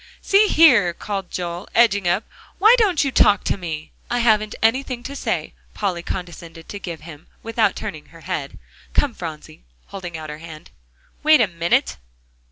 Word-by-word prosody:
"See 405 +2 +4
here!" 250 - +5
called 195 -3 -5
Joel, 175 +1 -5
edging 205 -5 +4
up, 175 +5 +1 0.3
"why 435 +4 +6
don't 380 -9 +3
you 275 - -1
talk 205 -5 +4
to - - 0
me?" 160 -4 -6 0.2
"I 245 - 0
haven't 215 -3 +2
anything 245 +2 0
to 280 - -7
say," - - -3 0.2
Polly 185 -4 -2
condescended 170 -2 -7
to 205 - -6
give 170 -4 -7
him, 155 -2 -12 0.2
without 225 -3 +1
turning 155 -1 -7
her 165 +1 -16
head. 155 -6 -5 0.4
"Come, 280 -4 +2
Phronsie," 160 - -8 0.3
holding 175 -4 -7
out 155 -1 -7
her 150 - -8
hand. 160 -2 -11 0.5
"Wait 310 0 +6
a 230 - +5
minute." 170 -2 0
190 Hz, 170 wpm, -21 LUFS, 170-235 Hz, 0.5 s, why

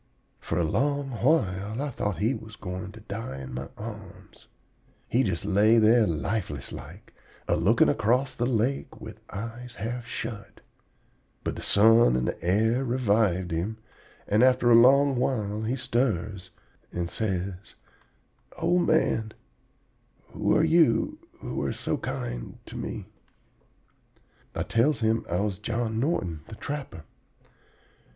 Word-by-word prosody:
"For - - -3
a 85 - +2
long 140 - 0
while 110 - +1
I 145 0 -2
thought 105 -6 -2
he 110 +9 +1
was 110 -4 -9
going 90 0 -6
to 110 - -12
die 100 -10 -6
in 65 -1 -8
my 65 +2 -5
arms. 105 -3 -10 0.6
He 125 - +2
just 95 -7 -1
lay 105 +3 +4
there 110 0 +5
lifeless 95 +7 -2
like, - - -10 0.3
a - - +2
looking 100 +9 +4
across 125 +4 +2
the 120 - -1
lake 125 +3 -1
with - - -10
eyes 115 +4 -7
half 120 +3 -4
shut. 115 -4 -6 0.8
But - - -2
the - - -7
sun 115 - +5
and 65 0 0
air 110 +8 +2
revived 105 -8 +1
him; 90 +7 -2 0.5
and 105 +2 +3
after 125 -1 +4
a - - +8
long 135 +3 +6
while 110 -5 -1
he 115 +4 -1
stirs 105 -8 -1 0.4
and 85 -1 -2
says: 95 -1 -3 0.8
"'Old 175 +2 +2
man, 115 -8 +1 1.0
who 105 0 +1
are 155 - +3
you 160 -8 +3 0.2
who - - -4
are - - -1
so - - -2
kind - - -5
to - - -10
me?' - - -5 1.5
"I - - -1
tells 120 +3 +1
him 110 0 +1
I 90 +2 0
was 100 -2 -2
John 115 0 -2
Norton, 95 - -1
the 110 - -9
trapper. 135 - -6
110 Hz, 140 wpm, -27 LUFS, 95-125 Hz, 1.5 s, a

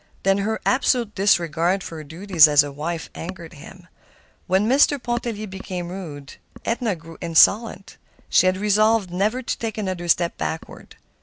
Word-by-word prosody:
Then 195 +1 +2
her 220 +2 -2
absolute 245 -4 +1
disregard 175 -1 +1
for 165 - -8
her 155 - -8
duties 165 +2 +4
as 145 -1 +5
a 145 - -6
wife 160 +4 -5
angered 170 -1 -8
him. 180 +4 -14 0.6
When 190 +3 +2
Mr. 285 +3 +4
Pontellier 240 -3 -3
became 185 -3 -6
rude, 155 -7 -9 0.3
Edna 230 -3 -1
grew 165 0 -14
insolent. 195 +5 +2 0.3
She 185 - +4
had 185 0 +1
resolved 210 -1 +2
never 210 +8 -1
to - - -3
take 225 -2 -4
another 185 -4 -4
step 170 0 +1
backward. 160 - -6
190 Hz, 155 wpm, -22 LUFS, 170-215 Hz, 0.6 s, as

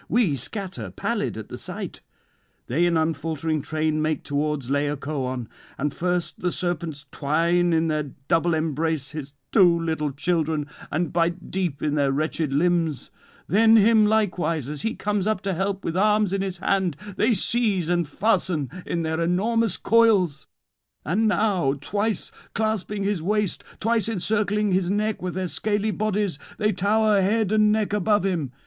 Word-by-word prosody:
We 215 - +2
scatter, 140 - -4
pallid - - -2
at - - -8
the - - -7
sight. - - -6 0.6
They 175 +2 +2
in 170 -1 +2
unfaltering 160 0 -1
train 155 +1 -1
make 155 0 -1
towards 145 -2 -1
Laocoön. 140 -3 -2 0.3
And 145 +1 -1
first 180 0 -2
the 180 - 0
serpents 170 -5 -3
twine 170 +4 +1
in 165 0 +2
their 155 -2 -1 0.2
double 165 0 +2
embrace 155 -2 -1
his 145 -2 -7 0.2
two 175 -5 +5
little 160 -3 -1
children, 155 0 0 0.3
and 170 -1 -1
bite 170 +1 0
deep 180 -7 -2
in 150 - +1
their 140 -2 +2
wretched 155 +1 -1
limbs; 165 0 +1 0.3
then 220 +3 +5
him 220 0 +6
likewise, 180 - 0
as 150 -1 -5
he 225 - -2
comes 205 -1 -1
up 215 -3 +1
to 195 -1 -1
help 195 +2 -2
with 165 - -2
arms 210 0 +3
in 195 - 0
his 190 -2 -3
hand, 190 -3 0 0.2
they 220 +3 +3
seize 205 -4 +1
and 175 -2 +1
fasten 175 - 0 0.2
in 170 -1 -1
their 160 +1 -1
enormous 210 +5 +1
coils; 205 -10 +3 0.6
and 200 - +2
now 195 -9 +2
twice 205 +9 -2 0.2
clasping 210 -1 -1
his 200 -4 0
waist, 210 +2 0 0.2
twice 230 0 +1
encircling 210 0 0
his 185 -1 +1
neck 210 +2 0
with 180 -1 -4
their 185 -1 -1
scaly 210 +3 -1
bodies, 205 -6 -1 0.2
they 210 0 +2
tower 210 +2 +2
head 210 +1 +1
and 215 -1 +4
neck 215 -1 0
above 210 -1 +2
him. 165 -9 -1
175 Hz, 160 wpm, -24 LUFS, 155-210 Hz, 0.6 s, him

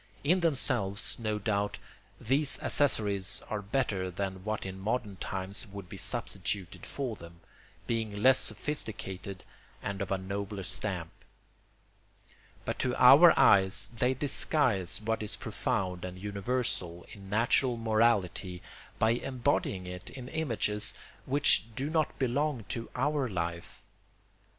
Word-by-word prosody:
In 175 +6 +3
themselves, 125 - +1
no 110 -2 -1
doubt, 105 -1 -1 0.4
these 140 +4 +2
accessories 100 -9 +2
are 105 -1 -1
better 100 -4 -1
than 95 0 -4
what 110 0 -3
in 95 0 -6
modern 105 -1 -2
times 95 +4 -4
would 100 -2 -9
be - - -8
substituted 95 -3 -2
for 130 -5 -2
them, 85 -2 -13 0.4
being 110 -3 -2
less 130 0 +7
sophisticated 100 -9 -4 0.4
and 100 0 -4
of 100 - -3
a 95 - +2
nobler 100 +1 -4
stamp; 90 -3 -2 1.5
but - - -3
to 125 -1 +1
our 140 +8 +8
eyes 95 0 +4
they 125 +3 +1
disguise 130 - +1
what 110 +1 -1
is 105 - -3
profound 90 -2 -2
and 90 0 -6
universal 100 -3 -2
in 100 -2 -12
natural 120 +3 +2
morality 110 -5 +1 0.3
by 110 - +3
embodying 120 -6 -1
it 90 0 -7
in 130 -2 -9
images 110 -9 0 0.3
which 135 -5 +4
do 140 +5 -2
not 155 -2 0
belong 135 0 0
to 115 -1 -3
our 140 +1 +1
life. 85 -3 -4
105 Hz, 125 wpm, -30 LUFS, 95-125 Hz, 1.5 s, our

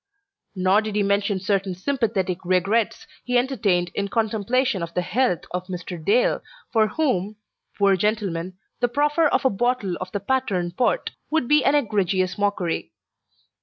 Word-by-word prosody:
Nor 190 +3 +3
did 215 -1 -5
he 210 - +2
mention 200 0 +1
certain 190 -1 -1
sympathetic 195 -5 -1
regrets 190 +5 +1 0.2
he 250 0 +1
entertained 210 -9 +1
in 200 - -1
contemplation 225 +1 0
of 170 0 -6
the 180 - +1
health 210 +1 +1
of 180 0 -4
Mr. 180 -2 -6
Dale, 225 +8 +2 0.3
for 220 -2 +4
whom, 215 - -1 0.4
poor 200 -1 +4
gentleman, 185 -3 -1 0.2
the 245 - +2
proffer 295 +5 +2
of 285 - 0
a 265 - +4
bottle 215 -3 0
of 185 0 -5
the 205 - -2
Patterne 200 -9 -1
Port 245 - 0 0.2
would 315 -5 +1
be 300 +1 +4
an 280 - +3
egregious 195 -8 +1
mockery. 200 - -1
205 Hz, 155 wpm, -23 LUFS, 185-245 Hz, 0.4 s, for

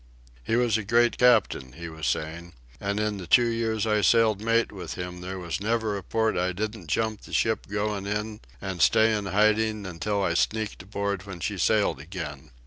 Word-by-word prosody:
"He 115 - 0
was 120 -2 +2
a - - -4
great 120 +3 +2
captain," 110 - +3
he 85 +4 -8
was 80 -1 -5
saying. 85 +3 -3 0.3
"An' 100 0 -2
in 105 -1 -1
the 90 -3 -8
two 120 +8 +6
years 115 -2 -1
I 105 -1 +2
sailed 110 -2 +4
mate 115 +1 +2
with 90 -5 -7
him 90 0 -6
there 95 +1 -5
was 85 0 -4
never 110 -1 0
a 100 - -4
port 110 +3 0
I 90 +1 0
didn't 105 -1 -4
jump 110 +5 -1
the - - -13
ship 110 -1 +1
goin' 105 -1 -2
in 105 +1 -3 0.2
an' 95 -2 -5
stay 110 +6 +5
in 105 -2 -3
hiding 110 +1 +2
until 95 +3 -2
I 85 - +1
sneaked 110 +4 -1
aboard 100 0 -3
when 95 -3 -7
she 100 +2 -3
sailed 105 -4 +2
again." 75 -3 -7
105 Hz, 200 wpm, -26 LUFS, 90-110 Hz, 0.3 s, two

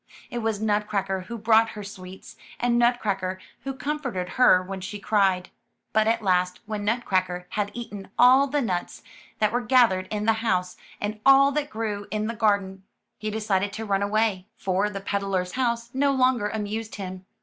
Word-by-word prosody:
It 240 - -3
was 220 -2 -1
Nutcracker 205 -3 -1
who 235 - -5
brought 225 +1 +4
her 210 - -5
sweets, 190 -2 -10 0.2
and 240 0 +2
Nutcracker 200 -6 +1 0.3
who 270 -1 -3
com 300 +3 -3
forted 185 -10 -4
her 245 -8 +5
when 190 +1 -6
she 195 +3 -5
cried. 195 -3 +1 0.4
But 220 0 +3
at 230 0 +1
last, 180 -1 +1
when 215 -1 -4
Nut 230 +4 0
cracker 180 -1 0
had 205 -1 -1
eaten 210 -5 -7
all 260 +3 +6
the 290 +1 0
nuts 180 -5 -3 0.3
that 215 -1 +2
were 245 +2 0
gathered 230 -6 +3
in 210 -1 -3
the 225 - +4
house, 180 -5 0 0.2
and 215 +1 -3
all 275 +1 +7
that 295 0 -2
grew 215 -2 -4
in 215 +1 -2
the 230 - -2
garden, 200 -4 0 0.4
he 215 - -3
de 215 +1 -3
cided 200 -1 0
to 220 +1 -5
run 200 -1 0
away, 205 -2 0
for 195 +2 0
the 200 -1 -6
peddler^s 195 -2 -1
house 235 -2 -1
no 280 +2 +2
longer 255 -5 +2
amused 220 +1 -4
him. 185 -1 -7
210 Hz, 185 wpm, -25 LUFS, 190-235 Hz, 0.4 s, all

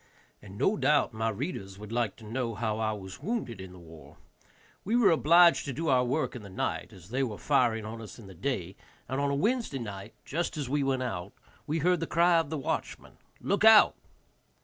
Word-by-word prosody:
And 100 -1 -12
no 200 - +2
doubt 145 -3 +2
my 110 +1 -1
readers 105 - -5
would 105 +1 -10
like 115 -3 -1
to 115 - -14
know 115 0 -3
how 110 0 -2
I 110 -1 0
was 95 +2 -8
wounded 160 - -3
in 95 -1 -9
the 90 - -13
war. 80 -2 -14 0.7
We 220 +5 0
were 240 -6 +5
obliged 170 +2 +5
to 140 - -4
do 160 +5 -2
our 130 -2 +4
work 135 +3 -1
in 120 - -7
the 100 - -11
night, 95 - -3
as 90 -1 -15
they 130 +4 -1
were 115 -6 -2
firing 120 -6 +1
on 115 +1 -7
us 105 -4 -10
in 115 - -12
the 95 - -11
day, 95 -3 -3 0.3
and 135 +1 -2
on 140 - +1
a 140 - 0
Wednesday 220 - 0
night, 105 -3 -7
just 170 +2 -2
as 145 -3 -3
we 145 +3 0
went 135 -1 0
out, 95 -6 -5 0.3
we 155 +2 0
heard 175 +2 +2
the 165 - -3
cry 170 0 +4
of 160 -3 -2
the 160 - -3
watchman. 135 - -4 0.2
"Look 200 +1 0
out." 220 -1 +8
125 Hz, 220 wpm, -29 LUFS, 105-155 Hz, 0.7 s, out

